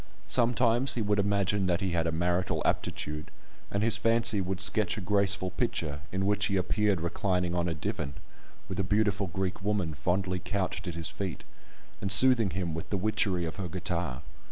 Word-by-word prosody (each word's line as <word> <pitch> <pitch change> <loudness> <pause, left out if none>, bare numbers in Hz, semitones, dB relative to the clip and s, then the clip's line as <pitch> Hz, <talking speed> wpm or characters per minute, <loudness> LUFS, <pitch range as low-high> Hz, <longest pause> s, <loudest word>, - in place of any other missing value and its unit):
Sometimes 120 +1 +2
he 120 - -1
would 105 0 +1
imagine 100 -1 +1
that 90 -1 +1
he 95 -2 -1
had 85 -1 0
a - - 0
marital 90 +2 0
aptitude, 75 0 -2 0.4
and 100 +1 -1
his 115 - +3
fancy 115 -3 +2
would 95 0 -3
sketch 100 +1 +2
a - - -2
graceful 100 -1 +1
picture, 80 -8 -2
in 95 +1 -1
which 105 0 +1
he 100 - 0
appeared 100 0 +1
reclining 90 0 -1
on 85 0 0
a 85 - -3
divan, 70 -2 -4 0.5
with 95 - -5
a - - +2
beautiful 105 0 +1
Greek 95 +2 -3
woman 100 -6 -1
fondly 90 +7 -1
couched 95 0 -3
at 85 - -4
his 85 -2 -2
feet, 95 -4 -5 0.6
and 95 - -1
soothing 115 0 +7
him 85 -1 -3
with 80 - -6
the 100 - 0
witchery 95 -3 +1
of 80 - -6
her 95 -2 -3
guitar. 85 -6 -3
95 Hz, 185 wpm, -29 LUFS, 85-105 Hz, 0.6 s, soothing